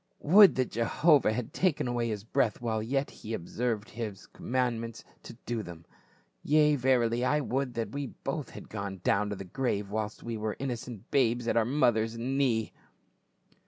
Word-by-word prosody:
Would 195 Hz, +6 st, +8 dB
that 130 Hz, -1 st, 0 dB
Jehovah 140 Hz, +4 st, +3 dB
had 110 Hz, +1 st, -4 dB
taken 175 Hz, -8 st, +1 dB
away 120 Hz, -1 st, -1 dB
his 105 Hz, -3 st, -3 dB
breath 110 Hz, -1 st, 0 dB
while 115 Hz, -2 st, -1 dB
he 110 Hz, -, -5 dB
yet 135 Hz, +2 st, -2 dB
observed 110 Hz, +2 st, -3 dB
His 110 Hz, -4 st, -6 dB
com -, -, -13 dB
mandments 120 Hz, -2 st, -1 dB, 0.2 s
to -, -, -10 dB
do 120 Hz, -2 st, -2 dB
them. 85 Hz, -4 st, -10 dB, 0.6 s
Yea, 150 Hz, 0 st, +4 dB
verily, 120 Hz, -3 st, +2 dB
I 145 Hz, +4 st, +2 dB
would 130 Hz, -2 st, -2 dB
that 115 Hz, -3 st, -3 dB
we 140 Hz, +1 st, -3 dB
both 135 Hz, +1 st, -5 dB
had -, -, -10 dB
gone 100 Hz, -3 st, -5 dB
down 105 Hz, +1 st, +2 dB
to 100 Hz, -, -3 dB
the 95 Hz, -, -7 dB
grave 105 Hz, -1 st, -2 dB
whilst 110 Hz, 0 st, -3 dB
we 115 Hz, -1 st, -4 dB
were 110 Hz, 0 st, -3 dB
innocent 120 Hz, -4 st, -6 dB
babes 120 Hz, -3 st, +2 dB
at -, -, +1 dB
our 115 Hz, -1 st, +3 dB
mother's 115 Hz, -4 st, +1 dB
knee 125 Hz, -2 st, 0 dB
115 Hz, 175 wpm, -29 LUFS, 110-130 Hz, 0.6 s, Would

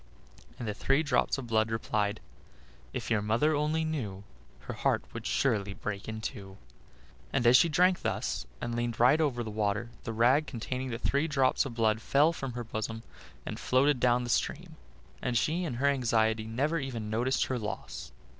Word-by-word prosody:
and 120 Hz, -, -5 dB
the 105 Hz, -, -1 dB
three 135 Hz, +7 st, +1 dB
drops 140 Hz, -3 st, +1 dB
of 135 Hz, -, -5 dB
blood 110 Hz, -1 st, +1 dB
replied: 110 Hz, -2 st, -1 dB, 0.7 s
"If -, -, -5 dB
your 110 Hz, -2 st, +3 dB
mother 115 Hz, +9 st, +2 dB
only 155 Hz, +2 st, +1 dB
knew, 110 Hz, -12 st, -4 dB, 0.4 s
Her -, -, -6 dB
heart -, -, +1 dB
would -, -, -5 dB
surely 100 Hz, -7 st, 0 dB
break 105 Hz, 0 st, -5 dB
in 110 Hz, 0 st, -5 dB
two." 100 Hz, -5 st, -6 dB, 0.7 s
And 135 Hz, -3 st, 0 dB
as 120 Hz, +1 st, +7 dB
she 170 Hz, +5 st, +6 dB
drank 180 Hz, +3 st, +3 dB
thus, 60 Hz, -, -2 dB
and 120 Hz, -, -3 dB
leaned 120 Hz, -1 st, -2 dB
right 130 Hz, +7 st, +5 dB
over 125 Hz, -6 st, 0 dB
the 110 Hz, -, -5 dB
water, 105 Hz, +2 st, -1 dB
the -, -, -4 dB
rag 125 Hz, +7 st, +3 dB
containing 130 Hz, +2 st, -4 dB
the 115 Hz, -, -3 dB
three 140 Hz, +5 st, +1 dB
drops 135 Hz, -4 st, +2 dB
of 120 Hz, -, -8 dB
blood 110 Hz, -1 st, +2 dB
fell 145 Hz, +7 st, +3 dB
from 135 Hz, -6 st, -5 dB
her 120 Hz, 0 st, -4 dB
bosom 115 Hz, 0 st, -4 dB, 0.4 s
and -, -, -5 dB
floated 135 Hz, +1 st, +3 dB
down 125 Hz, 0 st, +3 dB
the 120 Hz, -, -2 dB
stream, -, -, -1 dB, 0.5 s
and 120 Hz, -1 st, 0 dB
she 160 Hz, -, 0 dB
in 145 Hz, -, -3 dB
her 130 Hz, +4 st, -1 dB
anxiety 115 Hz, -5 st, +2 dB
never 145 Hz, +9 st, 0 dB
even 115 Hz, -6 st, -4 dB
noticed 125 Hz, +4 st, +1 dB
her 130 Hz, -2 st, -2 dB
loss. 105 Hz, -2 st, -6 dB
120 Hz, 185 wpm, -30 LUFS, 110-140 Hz, 0.7 s, as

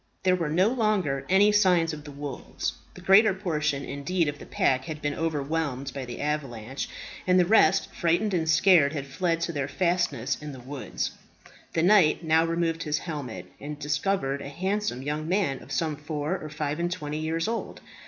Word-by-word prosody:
There 185 Hz, -1 st, +4 dB
were 165 Hz, -4 st, -2 dB
no 180 Hz, +7 st, +3 dB
longer 200 Hz, -, 0 dB
any 200 Hz, +3 st, +5 dB
signs 180 Hz, -6 st, +3 dB
of 150 Hz, -1 st, -8 dB
the 145 Hz, -, -8 dB
wolves. 140 Hz, -1 st, -5 dB, 0.2 s
The 185 Hz, -, -11 dB
greater 195 Hz, +2 st, +6 dB
portion, 150 Hz, -7 st, -1 dB
indeed, 165 Hz, +4 st, -1 dB
of 145 Hz, 0 st, -3 dB
the -, -, -11 dB
pack 130 Hz, 0 st, +1 dB
had 155 Hz, -1 st, -5 dB
been 145 Hz, -1 st, -1 dB
overwhelmed 145 Hz, -3 st, -2 dB
by 135 Hz, -2 st, -5 dB
the 120 Hz, -, -7 dB
avalanche, 135 Hz, -4 st, -3 dB, 0.4 s
and 180 Hz, 0 st, +5 dB
the 180 Hz, -, +5 dB
rest, 195 Hz, -1 st, +4 dB
frightened 175 Hz, +5 st, +1 dB
and 160 Hz, -3 st, 0 dB
scared, 160 Hz, -2 st, +5 dB
had 140 Hz, -3 st, -3 dB
fled 165 Hz, +4 st, -1 dB
to 170 Hz, -, -1 dB
their 140 Hz, -2 st, -2 dB
fastnesses 150 Hz, -, 0 dB
in 150 Hz, -1 st, -6 dB
the 130 Hz, -, -9 dB
woods. 130 Hz, +2 st, -4 dB, 0.6 s
The 165 Hz, -, +1 dB
knight 180 Hz, -4 st, +5 dB
now 160 Hz, 0 st, +4 dB
removed 165 Hz, 0 st, -1 dB
his 150 Hz, -2 st, 0 dB
helmet, 130 Hz, -, -5 dB
and 150 Hz, +1 st, -6 dB
discovered 150 Hz, -1 st, -1 dB
a 140 Hz, -, -6 dB
handsome 190 Hz, -4 st, -2 dB
yoking 150 Hz, +2 st, -3 dB
man 180 Hz, -8 st, +1 dB
of -, -, -13 dB
some 160 Hz, -2 st, 0 dB
four 150 Hz, +3 st, -3 dB
or 155 Hz, -, -6 dB
five 150 Hz, 0 st, -3 dB
and 175 Hz, 0 st, -1 dB
twenty 150 Hz, -3 st, -4 dB
years 165 Hz, +2 st, -1 dB
old. 230 Hz, 0 st, -3 dB
155 Hz, 190 wpm, -27 LUFS, 145-180 Hz, 0.6 s, greater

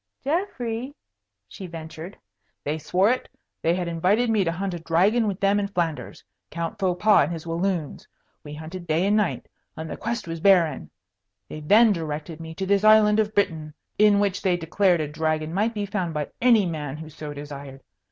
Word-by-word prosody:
"Geoffrey 265 Hz, -, -2 dB, 0.3 s
" 100 Hz, -1 st, -58 dB
she 185 Hz, -, -9 dB
ventured. 165 Hz, +2 st, -9 dB, 0.5 s
"They 150 Hz, +2 st, -2 dB
swore 185 Hz, +8 st, +2 dB
it. 255 Hz, -, -2 dB, 0.3 s
They 165 Hz, +1 st, +2 dB
had 180 Hz, -1 st, -2 dB
invited 190 Hz, +8 st, +1 dB
me 215 Hz, -3 st, +3 dB
to 165 Hz, -, 0 dB
hunt 190 Hz, +2 st, -3 dB
a 175 Hz, -, -5 dB
dragon 190 Hz, +8 st, +2 dB
with 195 Hz, -2 st, -3 dB
them 200 Hz, +1 st, +2 dB
in 200 Hz, -, -1 dB
Flanders, 170 Hz, -5 st, -3 dB, 0.3 s
Count 165 Hz, 0 st, -5 dB
Faux 180 Hz, -2 st, 0 dB
Pas 210 Hz, -2 st, +5 dB
and 155 Hz, -, -5 dB
his 165 Hz, -1 st, -6 dB
Walloons. 170 Hz, -2 st, -2 dB, 0.4 s
We 145 Hz, -, -8 dB
hunted 165 Hz, +3 st, -8 dB
day 160 Hz, +3 st, +1 dB
and 205 Hz, +1 st, +3 dB
night, 210 Hz, -4 st, 0 dB, 0.3 s
and 160 Hz, -, -5 dB
the -, -, -4 dB
quest 230 Hz, -4 st, -4 dB
was 165 Hz, 0 st, -5 dB
barren. 170 Hz, -6 st, +3 dB, 0.6 s
They 155 Hz, -, -7 dB
then 210 Hz, +8 st, +5 dB
directed 155 Hz, -1 st, -5 dB
me 160 Hz, 0 st, -8 dB
to 190 Hz, -, -3 dB
this 200 Hz, +1 st, +2 dB
island 215 Hz, 0 st, +6 dB
of 215 Hz, 0 st, 0 dB
Britain, 160 Hz, -6 st, -1 dB, 0.2 s
in 210 Hz, -1 st, +5 dB
which 200 Hz, -1 st, 0 dB
they 180 Hz, -2 st, +1 dB
declared 175 Hz, +1 st, +2 dB
a 150 Hz, -, -2 dB
dragon 155 Hz, +1 st, -2 dB
might 215 Hz, +5 st, 0 dB
be 205 Hz, -1 st, -2 dB
found 185 Hz, -5 st, -3 dB
by 150 Hz, -1 st, -2 dB
any 230 Hz, -5 st, +5 dB
man 150 Hz, -4 st, -4 dB
who 160 Hz, 0 st, -8 dB
so 155 Hz, -1 st, -8 dB
desired. 140 Hz, -2 st, -9 dB
175 Hz, 195 wpm, -24 LUFS, 160-205 Hz, 0.6 s, island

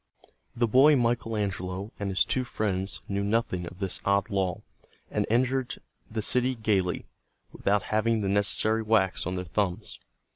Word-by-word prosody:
The 120 Hz, -, +2 dB
boy 135 Hz, +7 st, +6 dB
Michael 115 Hz, -3 st, 0 dB
Angelo 95 Hz, 0 st, -3 dB
and 100 Hz, -1 st, -2 dB
his 95 Hz, -, +2 dB
two 130 Hz, -, 0 dB
friends 100 Hz, -5 st, -2 dB
knew 100 Hz, 0 st, -1 dB
nothing 100 Hz, -5 st, 0 dB
of 90 Hz, -, -10 dB
this 95 Hz, -2 st, -3 dB
odd 100 Hz, +2 st, +1 dB
law, 95 Hz, -3 st, -1 dB, 0.5 s
and -, -, 0 dB
entered 125 Hz, +2 st, +1 dB, 0.3 s
the 110 Hz, -1 st, -3 dB
city 125 Hz, +3 st, +2 dB
gaily, 100 Hz, -5 st, 0 dB, 0.5 s
without 100 Hz, 0 st, +1 dB
having 110 Hz, +1 st, +2 dB
the 100 Hz, -, -1 dB
necessary 105 Hz, +2 st, +2 dB
wax 105 Hz, -6 st, +1 dB
on 90 Hz, -, -2 dB
their 90 Hz, 0 st, -3 dB
thumbs. 100 Hz, +3 st, -2 dB
105 Hz, 155 wpm, -28 LUFS, 95-115 Hz, 0.5 s, boy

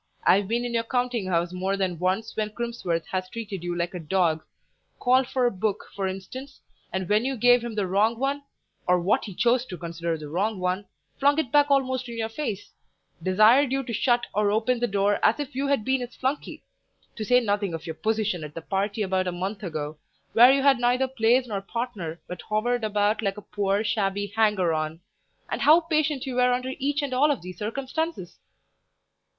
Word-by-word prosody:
I've 195 Hz, +1 st, +4 dB
been 235 Hz, +3 st, 0 dB
in 240 Hz, -, -3 dB
your 230 Hz, -1 st, +1 dB
counting 245 Hz, -3 st, -1 dB
house 175 Hz, -1 st, 0 dB
more 190 Hz, +2 st, -1 dB
than 185 Hz, -4 st, -1 dB
once 190 Hz, +5 st, -1 dB
when 215 Hz, -1 st, -1 dB
Crimsworth 215 Hz, -7 st, -3 dB
has 185 Hz, -1 st, -2 dB
treated 205 Hz, -5 st, -6 dB
you 175 Hz, 0 st, -2 dB
like 175 Hz, +1 st, -2 dB
a 180 Hz, -, -4 dB
dog; 165 Hz, -1 st, +1 dB, 0.6 s
called 255 Hz, +1 st, +3 dB
for 260 Hz, -1 st, 0 dB
a 240 Hz, -, +3 dB
book, 200 Hz, +2 st, -2 dB
for 195 Hz, -1 st, -1 dB
instance, 255 Hz, +9 st, -7 dB, 0.3 s
and 190 Hz, -1 st, -2 dB
when 210 Hz, +3 st, +3 dB
you 265 Hz, +1 st, -1 dB
gave 245 Hz, +1 st, +5 dB
him 235 Hz, -2 st, -5 dB
the 205 Hz, -2 st, 0 dB
wrong 210 Hz, +5 st, +2 dB
one, 275 Hz, +3 st, -1 dB, 0.5 s
or 180 Hz, 0 st, +4 dB
what 180 Hz, +4 st, +1 dB
he 200 Hz, -4 st, -8 dB
chose 240 Hz, +3 st, +3 dB
to 180 Hz, -, -7 dB
consider 170 Hz, -1 st, -3 dB
the 155 Hz, -1 st, -8 dB
wrong 195 Hz, +7 st, -1 dB
one, 185 Hz, +2 st, -1 dB, 0.3 s
flung 285 Hz, +1 st, +4 dB
it 315 Hz, -7 st, -1 dB
back 290 Hz, 0 st, +4 dB
almost 260 Hz, -2 st, +1 dB
in 235 Hz, -, -6 dB
your 225 Hz, -1 st, -2 dB
face; 225 Hz, -5 st, -4 dB, 0.5 s
desired 215 Hz, -, +5 dB
you 270 Hz, 0 st, 0 dB
to 235 Hz, -, -5 dB
shut 240 Hz, +2 st, +2 dB
or 210 Hz, 0 st, +2 dB
open 225 Hz, +4 st, +1 dB
the 240 Hz, -, +1 dB
door 200 Hz, 0 st, +1 dB
as -, -, +3 dB
if 290 Hz, -1 st, -4 dB
you 275 Hz, +2 st, -1 dB
had 275 Hz, -6 st, +1 dB
been 265 Hz, 0 st, +1 dB
his 245 Hz, 0 st, -7 dB
flunkey; 265 Hz, +3 st, -3 dB, 0.5 s
to 220 Hz, -, -4 dB
say 250 Hz, +4 st, +4 dB
nothing 205 Hz, -6 st, -1 dB
of 160 Hz, -, -8 dB
your 160 Hz, -, -4 dB
position 215 Hz, -2 st, -1 dB
at 150 Hz, 0 st, -8 dB
the 165 Hz, -, -5 dB
party 200 Hz, +3 st, -1 dB
about 190 Hz, -1 st, 0 dB
a -, -, 0 dB
month 190 Hz, +4 st, -4 dB
ago, 155 Hz, -5 st, -5 dB, 0.3 s
where 245 Hz, +3 st, +8 dB
you 275 Hz, 0 st, +2 dB
had 275 Hz, -3 st, +5 dB
neither 245 Hz, +2 st, +2 dB
place 250 Hz, 0 st, +2 dB
nor 205 Hz, -5 st, -3 dB
partner, 195 Hz, -7 st, -5 dB
but 180 Hz, -2 st, -7 dB
hovered 235 Hz, +3 st, 0 dB
about 210 Hz, 0 st, +1 dB
like 200 Hz, -1 st, -1 dB
a -, -, -7 dB
poor, 200 Hz, 0 st, +1 dB
shabby 205 Hz, -2 st, -1 dB
hanger 210 Hz, -6 st, +2 dB
on; 155 Hz, +1 st, -2 dB, 0.5 s
and -, -, -3 dB
how 305 Hz, +4 st, +7 dB
patient 310 Hz, -4 st, 0 dB
you 265 Hz, -, -4 dB
were 250 Hz, 0 st, +3 dB
under 255 Hz, +1 st, -2 dB
each 285 Hz, +2 st, 0 dB
and 275 Hz, -2 st, -3 dB
all 280 Hz, +4 st, +4 dB
of 285 Hz, -11 st, -1 dB
these 180 Hz, -1 st, -9 dB
circumstances!" 265 Hz, -, -4 dB
215 Hz, 210 wpm, -26 LUFS, 185-250 Hz, 0.6 s, where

